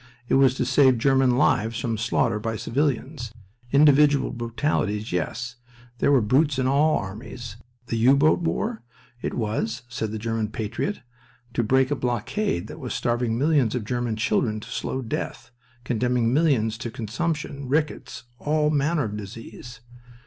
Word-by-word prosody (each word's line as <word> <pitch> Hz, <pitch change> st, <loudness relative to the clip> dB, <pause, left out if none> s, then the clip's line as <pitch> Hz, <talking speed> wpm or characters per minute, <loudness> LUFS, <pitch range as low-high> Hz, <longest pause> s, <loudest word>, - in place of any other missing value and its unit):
It -, -, -1 dB
was 135 Hz, -1 st, +5 dB
to 125 Hz, -, -1 dB
save 130 Hz, 0 st, +4 dB
German 130 Hz, 0 st, +3 dB
lives 115 Hz, -4 st, +2 dB
from 115 Hz, -2 st, -1 dB
slaughter 115 Hz, 0 st, 0 dB
by 115 Hz, +1 st, -3 dB
civilians. 125 Hz, +2 st, -2 dB, 0.4 s
Individual 145 Hz, 0 st, +5 dB
brutalities, 115 Hz, -3 st, -1 dB
yes. 120 Hz, +8 st, -3 dB, 0.4 s
There -, -, +3 dB
were 135 Hz, -3 st, +5 dB
brutes 135 Hz, +6 st, +2 dB
in 130 Hz, -, +1 dB
all 145 Hz, +4 st, +3 dB
armies. 105 Hz, +3 st, -7 dB, 0.3 s
The 115 Hz, -, -2 dB
U 130 Hz, +5 st, +5 dB
boat 155 Hz, +5 st, +4 dB
war? 215 Hz, +7 st, -2 dB, 0.4 s
It -, -, -3 dB
was 115 Hz, +2 st, -2 dB
(said 110 Hz, -3 st, -3 dB
the 110 Hz, -, -3 dB
German 115 Hz, 0 st, -2 dB
patriot) 110 Hz, -, -3 dB, 0.5 s
to -, -, +1 dB
break 130 Hz, +4 st, +2 dB
a -, -, +2 dB
blockade 120 Hz, -, -1 dB
that -, -, -9 dB
was -, -, -4 dB
starving 120 Hz, -1 st, 0 dB
millions 140 Hz, -4 st, +2 dB
of 120 Hz, -4 st, -3 dB
German 120 Hz, 0 st, -1 dB
children 110 Hz, 0 st, 0 dB
to -, -, -11 dB
slow 130 Hz, -, -3 dB
death, 115 Hz, +1 st, -5 dB, 0.3 s
condemning 120 Hz, -1 st, +1 dB
millions 125 Hz, -8 st, +2 dB
to 120 Hz, -, -4 dB
consumption, 140 Hz, +5 st, -3 dB
rickets, 150 Hz, -2 st, -1 dB, 0.2 s
all 150 Hz, 0 st, +1 dB
manner 150 Hz, +1 st, +1 dB
of 105 Hz, -2 st, -4 dB
disease. 115 Hz, +3 st, -9 dB
125 Hz, 155 wpm, -24 LUFS, 115-140 Hz, 0.5 s, was